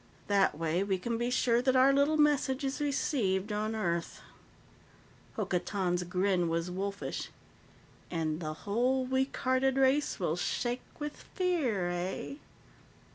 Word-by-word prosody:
That 195 Hz, -6 st, +2 dB
way, 165 Hz, +3 st, 0 dB
we 195 Hz, -1 st, 0 dB
can 230 Hz, +5 st, -3 dB
be 240 Hz, +1 st, 0 dB
sure 240 Hz, -1 st, +2 dB
that 260 Hz, +1 st, +2 dB
our 260 Hz, +2 st, +6 dB
little 285 Hz, +3 st, +3 dB
message 290 Hz, -3 st, +2 dB
is 270 Hz, +1 st, -2 dB
received 220 Hz, -9 st, 0 dB
on 215 Hz, +1 st, -1 dB
Earth." 170 Hz, -5 st, -2 dB, 1.1 s
Hokotan's 180 Hz, -1 st, -1 dB
grin 180 Hz, -1 st, +1 dB
was 165 Hz, +2 st, -1 dB
wolfish. 200 Hz, +2 st, -4 dB, 0.8 s
"And 160 Hz, -2 st, -1 dB
the 155 Hz, -2 st, -3 dB
whole 250 Hz, +5 st, +1 dB
weak 265 Hz, +1 st, 0 dB
hearted 260 Hz, +1 st, +2 dB
race 270 Hz, +2 st, +2 dB
will 170 Hz, -4 st, 0 dB
shake 240 Hz, +7 st, -1 dB, 0.2 s
with 295 Hz, 0 st, -4 dB, 0.2 s
fear, 270 Hz, -, +1 dB
eh?" 180 Hz, +10 st, -4 dB
215 Hz, 130 wpm, -31 LUFS, 180-265 Hz, 1.1 s, our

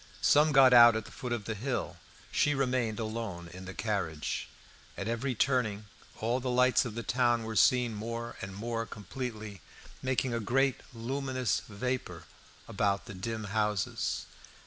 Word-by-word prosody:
Some 150 Hz, +1 st, +5 dB
got 135 Hz, -2 st, +7 dB
out 120 Hz, -1 st, +9 dB
at 110 Hz, -1 st, -2 dB
the 110 Hz, -, -12 dB
foot 125 Hz, -, -6 dB
of 115 Hz, -4 st, -2 dB
the 110 Hz, -, -2 dB
hill. 125 Hz, +5 st, -3 dB, 0.3 s
She 145 Hz, 0 st, +2 dB
remained 125 Hz, -4 st, 0 dB
alone 110 Hz, -6 st, -4 dB
in 95 Hz, +2 st, -10 dB
the 95 Hz, -, -7 dB
carriage. 95 Hz, -8 st, -2 dB, 0.5 s
At 100 Hz, -, -3 dB
every 120 Hz, +3 st, -1 dB
turning 110 Hz, -5 st, +1 dB, 0.3 s
all 120 Hz, +3 st, 0 dB
the 130 Hz, 0 st, -3 dB
lights 125 Hz, 0 st, +4 dB
of 115 Hz, -3 st, -5 dB
the 115 Hz, -, -4 dB
town 120 Hz, 0 st, +2 dB
were 110 Hz, 0 st, -5 dB
seen 125 Hz, 0 st, +4 dB
more 115 Hz, +2 st, -5 dB
and 95 Hz, -1 st, -6 dB
more 115 Hz, +2 st, -3 dB
completely, 110 Hz, -2 st, -6 dB, 0.4 s
making 130 Hz, -1 st, 0 dB
a 115 Hz, -, 0 dB
great 135 Hz, +4 st, +1 dB
luminous 130 Hz, -1 st, -1 dB
vapour 125 Hz, +5 st, -3 dB, 0.4 s
about 100 Hz, -1 st, 0 dB
the -, -, -8 dB
dim 110 Hz, +4 st, -4 dB
houses. 105 Hz, -3 st, 0 dB
115 Hz, 160 wpm, -31 LUFS, 105-125 Hz, 0.5 s, out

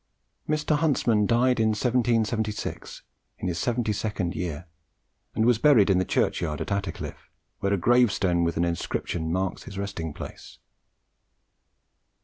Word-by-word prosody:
Mr. 150 Hz, 0 st, +1 dB
Huntsman 120 Hz, -9 st, +2 dB
died 125 Hz, +1 st, +3 dB
in 110 Hz, -, +3 dB
1776, 115 Hz, -2 st, -1 dB, 0.3 s
in -, -, -4 dB
his 85 Hz, -2 st, -2 dB
seventy 120 Hz, -3 st, 0 dB
second 100 Hz, -4 st, -2 dB
year, 85 Hz, -1 st, -4 dB, 0.7 s
and 110 Hz, -, +2 dB
was 120 Hz, -2 st, +4 dB
buried 115 Hz, -10 st, +5 dB
in 90 Hz, -, +3 dB
the 95 Hz, -, +1 dB
churchyard 75 Hz, -3 st, 0 dB
at -, -, -4 dB
Attercliffe, 100 Hz, 0 st, -4 dB, 0.3 s
where 100 Hz, -, 0 dB
a 100 Hz, -, +2 dB
gravestone 100 Hz, -5 st, +3 dB
with 85 Hz, -1 st, -1 dB
an 85 Hz, -, +2 dB
inscription 85 Hz, -1 st, -2 dB
marks 95 Hz, +1 st, -2 dB
his 95 Hz, -, -9 dB
resting 100 Hz, -5 st, -4 dB
place. -, -, -10 dB
105 Hz, 135 wpm, -26 LUFS, 90-120 Hz, 0.7 s, buried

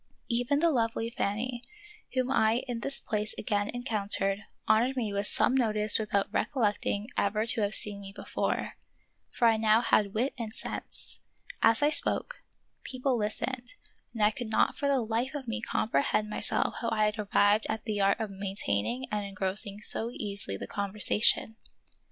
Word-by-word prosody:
Even 245 Hz, +4 st, +1 dB
the 335 Hz, -1 st, +4 dB
lovely 230 Hz, -2 st, -1 dB
Fanny, 235 Hz, +2 st, -2 dB, 0.5 s
whom 255 Hz, 0 st, 0 dB
I 225 Hz, -1 st, +2 dB
in 240 Hz, -2 st, -3 dB
this 275 Hz, +3 st, -2 dB
place 215 Hz, -2 st, -2 dB
again 205 Hz, 0 st, -1 dB
encountered, 205 Hz, -5 st, 0 dB, 0.3 s
honored 245 Hz, +5 st, +3 dB
me 220 Hz, -5 st, -1 dB
with 200 Hz, +1 st, 0 dB
some -, -, +2 dB
notice 215 Hz, -5 st, +5 dB
without 205 Hz, -1 st, -1 dB
recollecting 210 Hz, -5 st, 0 dB
ever 210 Hz, +2 st, +1 dB
to 230 Hz, -1 st, +1 dB
have 205 Hz, +1 st, 0 dB
seen 205 Hz, -1 st, -2 dB
me 195 Hz, 0 st, -9 dB
before; -, -, -3 dB, 0.5 s
for 235 Hz, -, +2 dB
I 225 Hz, -1 st, +4 dB
now 220 Hz, +1 st, +4 dB
had 210 Hz, -4 st, +2 dB
wit 250 Hz, +6 st, 0 dB
and 225 Hz, -2 st, -4 dB
sense. -, -, -7 dB, 0.4 s
As 225 Hz, +4 st, +4 dB
I 295 Hz, -, +4 dB
spoke, -, -, -1 dB, 0.4 s
people 255 Hz, 0 st, -1 dB
listened, 240 Hz, +3 st, -3 dB, 0.4 s
and 225 Hz, -3 st, -2 dB
I 210 Hz, -, +5 dB
could 235 Hz, 0 st, -6 dB
not 220 Hz, -, +2 dB
for 285 Hz, -, -2 dB
the 275 Hz, -2 st, +2 dB
life 230 Hz, +5 st, -2 dB
of 270 Hz, -4 st, -6 dB
me 230 Hz, +1 st, -3 dB
com 230 Hz, -, -1 dB
prehend 210 Hz, +9 st, +1 dB
myself 210 Hz, -, 0 dB
how 230 Hz, -, -1 dB
I 215 Hz, -1 st, +2 dB
had 210 Hz, +1 st, -1 dB
arrived 205 Hz, +1 st, +3 dB
at 220 Hz, -, -3 dB
the 210 Hz, -3 st, -1 dB
art 195 Hz, 0 st, +3 dB
of 220 Hz, -2 st, -3 dB
maintaining 195 Hz, -, -2 dB
and 210 Hz, -1 st, -1 dB
engrossing 200 Hz, +1 st, -2 dB
so 225 Hz, +2 st, +6 dB
easily 200 Hz, -, -4 dB
the -, -, -6 dB
con 200 Hz, -1 st, -4 dB
versation. 215 Hz, +2 st, +2 dB
220 Hz, 175 wpm, -29 LUFS, 205-240 Hz, 0.5 s, so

